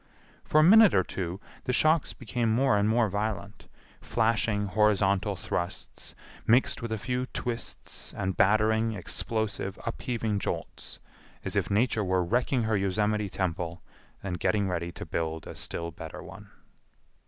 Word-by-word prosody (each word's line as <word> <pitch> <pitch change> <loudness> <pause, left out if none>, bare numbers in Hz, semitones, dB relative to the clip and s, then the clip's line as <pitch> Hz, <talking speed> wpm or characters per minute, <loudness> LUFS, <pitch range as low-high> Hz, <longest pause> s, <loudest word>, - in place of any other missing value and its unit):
For 155 - +3
a - - +7
minute 215 +4 +8
or 95 - +4
two 90 0 -4 0.3
the 125 - 0
shocks 155 +4 +3
became 115 -1 -1
more 125 0 +3
and 105 +1 +2
more 115 0 +3
violent—flashing 105 +1 -2
horizontal 100 0 +2
thrusts 85 0 -5 0.3
mixed 125 +3 +3
with 115 -1 -4
a 110 - 0
few 125 +3 -2
twists 120 -2 -5
and 95 0 -1
battering, 110 +2 +3
explosive, 105 +1 -3
upheaving 115 -3 -2
jolts,—as - - -6
if - - +1
Nature 110 +1 +2
were 95 -1 +1
wrecking 120 +6 +1
her 110 0 +1
Yosemite 105 +1 0
temple, 85 -2 -3 0.4
and 90 -3 -3
getting 100 -2 +1
ready 85 -1 -2
to - - -8
build 80 -1 -3
a - - -7
still 85 0 -3
better 80 0 -8
one. - - -11
105 Hz, 140 wpm, -28 LUFS, 95-115 Hz, 0.4 s, minute